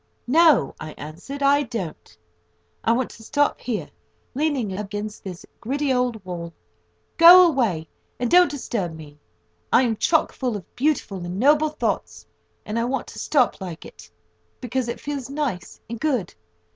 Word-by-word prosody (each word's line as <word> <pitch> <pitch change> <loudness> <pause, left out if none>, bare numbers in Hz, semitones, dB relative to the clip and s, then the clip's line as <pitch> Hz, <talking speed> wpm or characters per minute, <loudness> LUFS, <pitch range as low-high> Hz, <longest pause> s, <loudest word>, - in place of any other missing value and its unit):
"No," 315 +1 +4
I 155 -1 -7
answered, 180 - -7
"I 285 +1 +5
don't. 215 - -6 0.7
I 225 - +2
want 240 +1 0
to 225 - -14
stop 290 +6 0
here, 235 -4 -3 0.5
leaning 270 -8 -1
up 205 +3 -3
against 210 +1 -6
this 185 -2 -8
gritty 270 +4 -1
old 245 -5 -1
wall. 170 -2 -6 0.6
Go 355 +2 +10
away, 230 - 0 0.3
and 245 - -1
don't 355 -1 +6
disturb 225 - -3
me. 150 -2 -12 0.5
I 260 - +5
am 230 -3 +1
chock 320 +8 +2
full 245 -5 -2
of 185 - -14
beautiful 250 - -1
and 175 +2 -5
noble 295 +4 +4
thoughts, 305 - -3 0.4
and 215 +2 -2
I - - +1
want 270 +2 -2
to - - -9
stop 260 -8 +1
like 175 -3 -7
it, 85 0 -13 0.5
because 250 0 -2
it 235 - -4
feels 280 -3 -5
nice 275 - -4
and 235 0 -6
good. 250 - -1
240 Hz, 160 wpm, -23 LUFS, 190-285 Hz, 0.7 s, Go